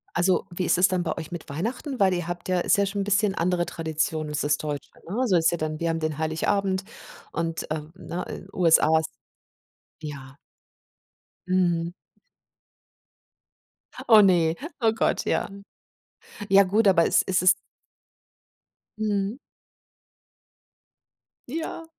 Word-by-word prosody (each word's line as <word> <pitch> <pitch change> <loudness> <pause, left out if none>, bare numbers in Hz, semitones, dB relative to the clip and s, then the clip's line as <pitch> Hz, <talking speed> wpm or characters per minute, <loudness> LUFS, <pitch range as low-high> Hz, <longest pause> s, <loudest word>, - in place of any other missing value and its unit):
Also, 180 +2 +2
wie 180 +1 -3
ist - - +2
es 180 +2 +5
dann 185 -1 0
bei 165 - -2
euch 155 - -7
mit 175 -2 -7
Weihnachten? 235 - -4
Weil 190 -2 +4
ihr 175 -2 -3
habt 175 +1 -5
ja 185 -1 +2
Ist 205 - +2
ja 200 - +3
schon 200 +1 -3
'n - - 0
bisschen 205 0 +2
andere 175 0 0
Tradition 160 -1 -2
als 150 0 -3
das 145 0 +1
Deutsche, 145 -2 -5 0.2
ne? 240 +7 0
So 185 -5 +4
ist 165 0 +3
ja 170 - -1
dann 155 -1 -3
wir 170 - -1
haben 165 0 -1
den 155 -2 -2
Heiligabend 190 +5 0 0.5
und, 165 -1 -3
ähm, 155 0 -4
ne, 180 -1 -5
in 185 - -8
USA 160 -2 +4
ist 160 - -4 0.9
Ja. 140 -3 -8 1.1
Mhm. 175 -2 +1 2.2
Oh, 220 -2 +8
ne, 170 -5 +3 0.3
oh 225 -1 +4
Gott, 225 - 0
ja. - - 0 1.0
Ja 195 +1 +7
gut, 205 +3 +2
aber 175 -4 +5
es - - +4
ist 185 - +1
es 185 +1 +7 1.5
Mhm. 210 0 -1 2.1
Ja, 325 +3 -5
175 Hz, 145 wpm, -25 LUFS, 160-195 Hz, 2.2 s, Oh